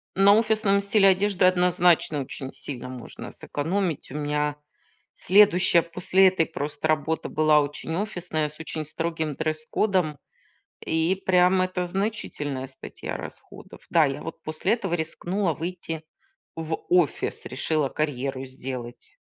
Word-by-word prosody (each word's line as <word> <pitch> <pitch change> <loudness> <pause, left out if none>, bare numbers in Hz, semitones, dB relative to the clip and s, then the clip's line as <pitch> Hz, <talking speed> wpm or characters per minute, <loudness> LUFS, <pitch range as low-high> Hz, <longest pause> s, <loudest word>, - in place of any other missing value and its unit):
На 195 +1 +6
офисном 215 -3 +3
стиле 200 0 +4
одежды, 190 -1 +2
однозначно, 180 -4 +3
очень 130 0 -7
сильно 125 -2 -7
можно 125 -2 -8
сэкономить. 165 +1 -2
У 145 - -7
меня 150 0 -1 0.6
следующая 185 -3 +5
после 180 +3 +3
этой 180 -3 +2
просто 150 -1 -3
работа 155 +1 0
была 155 -1 +4
очень 145 +3 -4
офисная 175 -6 -2
с 150 - -14
очень 160 -1 -4
строгим 160 -1 -3
дресс-кодом. 155 +1 0 0.7
И 165 +4 +1
прям 185 0 +4
это 185 -1 -1
значительная 175 -9 -3
статья 130 - -7
расходов. - - -11
Да, 165 -3 +5
я 135 -1 -3
вот 165 - -7
после 155 +7 -1
этого 195 -7 -2
рискнула 175 +3 -1
выйти 165 -1 -5 0.5
в 160 0 -2
офис, 175 -5 +1
решила 155 -4 0
карьеру 135 -3 -2
сделать. 130 -2 -8
165 Hz, 130 wpm, -25 LUFS, 150-185 Hz, 0.7 s, На